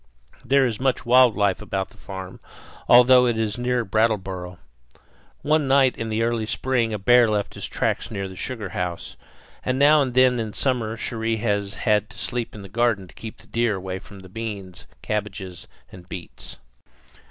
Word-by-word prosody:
There 135 +2 +3
is 115 -4 -2
much 135 0 0
wild 125 -1 +5
life 100 -2 +1
about 95 -2 -3
the - - -20
farm, 95 -2 -8 0.5
although 125 +1 +7
it 120 -2 0
is 110 0 -2
near 125 -1 0
Brattleboro. 95 -4 -1 0.9
One 150 -1 +2
night 135 -1 +4
in 115 -1 -4
early 115 -1 0
spring 120 -1 0
a 105 - -2
bear 120 +3 +5
left 105 -1 -1
his - - -6
tracks - - -1
near 100 -3 -4
the 95 - -10
sugar 110 -1 -5
house; 90 -1 -4 0.5
and 130 0 -1
now 145 +2 +6
and 130 -3 -2
then 130 -1 +4
in 110 -2 -4
summer 115 -4 -1
Cherrie 115 0 -2
has 105 -2 -1
had 105 -1 +1
to - - -15
sleep 120 -2 -4
in 105 - -9
the - - -9
garden 110 -2 0
to - - -17
keep 110 -1 -9
the - - -19
deer 115 -2 0
away 95 0 -5
from 100 0 -14
the 95 - -12
beans, 100 -4 -7 0.2
cabbages, 105 -4 -4 0.2
and 90 -1 -14
beets. 90 -2 -9
110 Hz, 180 wpm, -23 LUFS, 100-125 Hz, 0.9 s, although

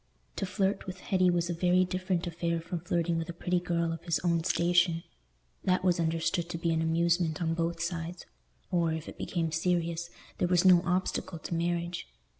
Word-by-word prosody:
To 195 - -1
flirt 195 +1 0
with 185 0 -6
Hetty 185 -2 +2
was 175 -1 +1
a 175 - -1
very 180 +2 +3
different 185 -1 -1
affair 170 0 -1
from 170 +1 -4
flirting 170 -1 0
with 165 - -4
a - - -3
pretty 175 +1 0
girl 170 -1 0
of 165 - -8
his 170 -2 +1
own 170 -2 +1
station: 170 -1 +2 0.6
that 185 0 +2
was 180 -1 +3
understood 165 +1 0
to 170 - -3
be 170 0 0
an 160 0 +1
amusement 165 0 +1
on 165 -2 0
both 165 0 -1
sides, 170 +1 -4 0.5
or, 170 -2 +2
if 160 0 -4
it - - -10
became 165 -3 -1
serious, 170 0 0 0.3
there 180 - +2
was 180 +1 +3
no 180 -2 +8
obstacle 180 -1 -1
to 160 - -6
marriage. 170 +1 -1
170 Hz, 195 wpm, -30 LUFS, 165-180 Hz, 0.6 s, no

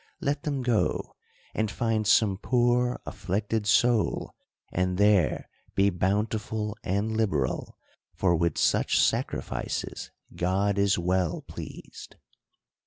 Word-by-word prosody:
77 - - -9
let 145 +1 0
them 140 -4 -2
go, 120 -4 0 0.4
and 110 -1 0
find 110 -1 -1
some 105 -2 +4
poor 125 0 +2
afflicted 105 +3 -2
soul, 120 +1 +2 0.4
and 90 0 0
there 100 -4 +3 0.3
be 100 +1 +4
bountiful 105 +3 -1
and 100 +4 -1
liberal; 95 - -1 0.4
for 85 +1 +2
with 85 -1 0
such - - +2
sacrifices - - -1 0.3
God 100 +3 +1
is 100 0 +3
well 90 0 0
pleased. - - -10
105 Hz, 110 wpm, -27 LUFS, 95-110 Hz, 0.4 s, some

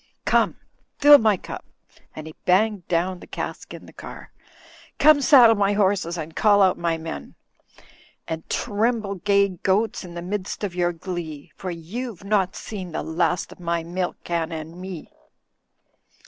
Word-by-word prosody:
Come, - - +2 0.4
fill 290 0 +7
up 290 - +10
my 215 -3 +3
cup," - - -8 0.5
and 155 - -7
he 160 - -9
banged 195 0 +2
down 180 +2 0
the - - -13
cask - - -6
in - - -9
the - - -15
car, - - -10 0.7
"come 305 -2 +6
saddle 250 -5 +7
my 200 0 +2
horses 190 -4 +1
and 160 0 -6
call 205 -2 +5
out 185 -1 +4
my 170 -1 -1
men. 115 - -7 0.9
And 160 0 -5
tremble, 220 -1 0
gay 200 +1 +2
goats, 200 +5 0
in 175 -2 -10
the 170 - -5
midst 195 +2 -4
of 195 -4 -2
your 175 -1 +1
glee; 165 -4 -7
for 185 - -6
you've 195 +6 -6
no' 200 -2 +2
seen 185 -6 -7
the - - -2
last 170 +1 -1
of - - -13
my 170 -1 -1
milk 180 +2 -3
can 170 -1 -2
and 160 +2 -7
me." 185 -4 -8
185 Hz, 165 wpm, -23 LUFS, 170-205 Hz, 0.9 s, up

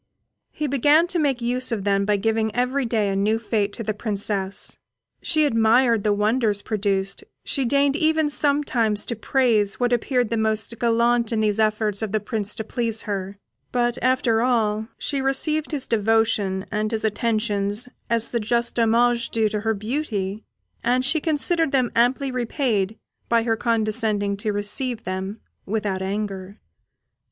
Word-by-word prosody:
He 305 - -4
began 290 +4 +4
to 360 -2 -1
make 270 -5 0
use 250 +2 -1
of 215 -4 -2
them 200 0 +1
by 210 0 +2
giving 220 +1 0
every 250 +2 0
day 220 -3 +1
a 195 - -1
new 210 +3 +1
fête 215 -2 -1
to 230 - -5
the 215 0 -2
Princess. 205 -2 -2 0.4
She 310 -2 +2
admired 230 -2 +3
the 210 - +2
wonders 210 0 +1
produced, 195 - -1 0.2
she 270 -3 -1
deigned 280 +2 +2
even 315 -1 +2
sometimes 280 -8 +1
to 235 - -3
praise 220 -4 +1
what 245 -1 +1
appeared 245 -1 0
the 230 - +1
most 220 +1 -1
gallant 235 0 +2
in 225 - 0
these 215 0 +1
efforts 215 -1 +1
of 220 -2 -3
the 215 - +2
Prince 210 -1 -3
to 220 - -4
please 225 -1 -2
her; 200 -1 -4 0.3
but 240 -1 0
after 250 -3 +2
all, 220 -3 +1
she 280 -2 -2
received 300 +3 +1
his 290 -5 -2
devotion 215 -3 +1
and 215 0 -1
his 220 -1 -2
attentions 215 0 -1 0.2
as 230 -1 0
the 235 - 0
just 235 +2 -1
homage 235 +1 +2
due 220 -1 +1
to 210 - -2
her 220 0 0
beauty, 215 -3 -3 0.4
and 250 +2 +1
she 310 +3 +2
considered 320 0 +1
them 255 -3 +1
amply 260 +3 +2
repaid 230 -5 -1 0.3
by 230 -1 +3
her 225 -1 +1
condescending 215 -3 0
to 210 +2 -2
receive 210 +4 -1
them 190 +3 -4 0.3
without 205 -2 -2
anger. 195 0 -4
225 Hz, 165 wpm, -23 LUFS, 210-250 Hz, 0.4 s, began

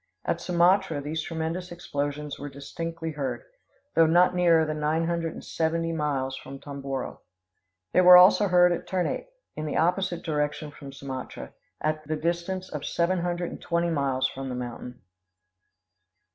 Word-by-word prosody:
At - - -1
Sumatra 180 -1 +3
these 150 +3 -3
tremendous 165 +3 -4
explosions 145 -3 -4
were 145 - -5
distinctly 165 +4 -5
heard, 145 - -3 0.5
though 165 -1 +5
not 175 +3 +5
nearer 170 -3 +4
than 155 0 -3
nine 155 +2 +1
hundred 170 -1 -1
and - - -10
seventy 165 +1 -1
miles 140 -4 -1
from 135 +1 -9
Tomboro. 135 -2 -5 0.7
They 185 - +6
were 180 0 +10
also 190 +3 +7
heard 180 -1 +5
at 175 - -3
Ternate, 190 - -2 0.2
in 155 0 -4
the 150 - -2
opposite 175 +1 +1
direction 150 -1 -2
from 140 -1 -10
Sumatra, 135 -1 -7 0.3
at 155 0 -1
the 155 - -1
distance 175 +4 -2
of 150 -2 -6
seven 175 +2 0
hundred 175 0 -2
and - - -9
twenty 170 0 0
miles 135 -4 +1
from 135 0 -6
the 125 - -3
mountain. 125 -1 -7
160 Hz, 160 wpm, -27 LUFS, 145-175 Hz, 0.7 s, were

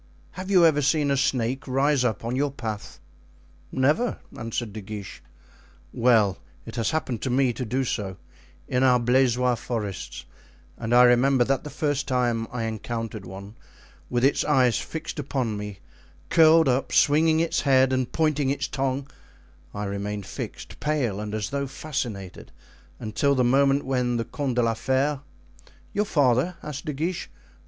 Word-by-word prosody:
Have 185 +1 -7
you 185 -4 +6
ever 150 -3 +4
seen 145 0 +2
a - - +3
snake 135 -1 0
rise 135 +1 +2
up 115 -2 -1
on 120 +2 -2
your 145 +2 +1
path?" 110 -5 -6 0.7
"Never," 150 - +1 0.2
answered 115 -1 -4
De 110 - -6
Guiche. 100 -1 -8 0.7
"Well, 110 -6 +3 0.3
it 115 - -8
has 115 -2 0
happened 135 -8 -2
to - - -2
me 130 0 +2
to 125 - -4
do 130 +4 0
so 100 -6 -3 0.5
in 125 - 0
our 125 -2 +5
Blaisois 125 0 +3
forests, 110 -5 -5 0.5
and 115 0 -5
I 125 - +8
remember 125 +1 +5
that 135 +2 0
the 150 - -7
first 145 -2 -1
time 120 -3 0
I 120 -2 -3
encountered 110 -2 -4
one 100 +2 -9 0.6
with 120 0 0
its 140 - +3
eyes 130 -5 +3
fixed 160 -1 -6
upon 130 -6 -2
me, 105 -1 -6 0.5
curled 160 -1 +6
up, 130 +1 +1
swinging 160 +2 +4
its 165 0 +1
head 130 -2 +4
and 130 -1 -1
pointing 150 -4 +1
its 140 - -1
tongue, 135 0 -2 0.6
I 105 - -5
remained 100 0 -4
fixed, - - -7
pale 135 -10 -1
and 105 0 -4
as 105 -2 -3
though 140 0 -2
fascinated, 120 - -5 0.5
until 140 +6 0
the 130 - +2
moment 135 +3 +3
when 125 -2 0
the 115 - -2
Comte 140 -4 -3
de 120 - +2
la 115 0 +2
Fere——" 135 +4 0 0.7
"Your 210 +1 +1
father?" 145 - +2
asked 145 -1 -6
De 150 - -2
Guiche. 165 +5 -3
130 Hz, 165 wpm, -25 LUFS, 115-140 Hz, 0.7 s, I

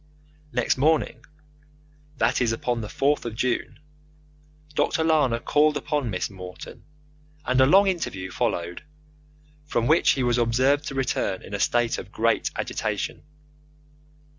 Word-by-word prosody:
Next 125 -1 +1
morning 155 +3 +1 0.9
that - - +1
is, 120 -2 +2
upon 115 +1 -2
the 105 - -5
4th 140 +6 0
of 115 -2 -5
June 125 +1 -1 1.0
Dr. 160 - +1
Lana 150 -7 +2
called 150 +3 +2
upon 145 -3 -2
Miss 90 -3 -2
Morton, 90 -2 -10 0.6
and 130 +1 +2
a 130 - +6
long 195 +6 +6
interview 145 - -2
followed, 85 - -2 0.8
from 120 -6 -1
which 155 +6 +4
he 135 - -1
was 120 0 +2
observed 130 +5 +2
to 135 - -5
return 125 -7 -1
in 100 - -10
a 100 - -2
state 120 +1 +1
of - - -10
great - - +1
agitation. - - -3
125 Hz, 140 wpm, -25 LUFS, 115-145 Hz, 1.0 s, a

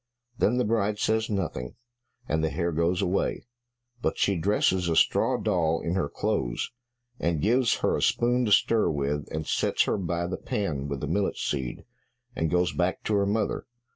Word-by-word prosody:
Then 120 +1 +2
the 125 - +2
bride 105 -1 +1
says 110 +1 +1
nothing, 90 - -3 0.5
and 80 +1 0
the 80 - +2
hare 85 +4 -1
goes 85 +3 +1
away, 95 +2 -1 0.6
but - - -1
she 100 - +2
dresses 90 0 +1
a 80 - +1
straw - - +3
doll 80 -2 +1
in 85 - -2
her 90 -6 0
clothes, - - -2 0.5
and 85 -2 0
gives 120 - +3
her - - +2
a - - -2
spoon 120 +1 +2
to 105 - -1
stir 110 +2 +4
with, 70 0 -2
and 80 0 -3
sets - - +1
her - - 0
by 85 -1 -1
the 90 - -3
pan 75 -9 -2
with 70 -1 -4
the 75 - -2
millet 95 +6 0
seed, 65 -4 -3 0.5
and 80 - 0
goes 90 +2 +1
back 90 +1 -1
to 110 - -1
her 100 -1 +2
mother. 110 +2 -1
90 Hz, 185 wpm, -27 LUFS, 80-105 Hz, 0.6 s, stir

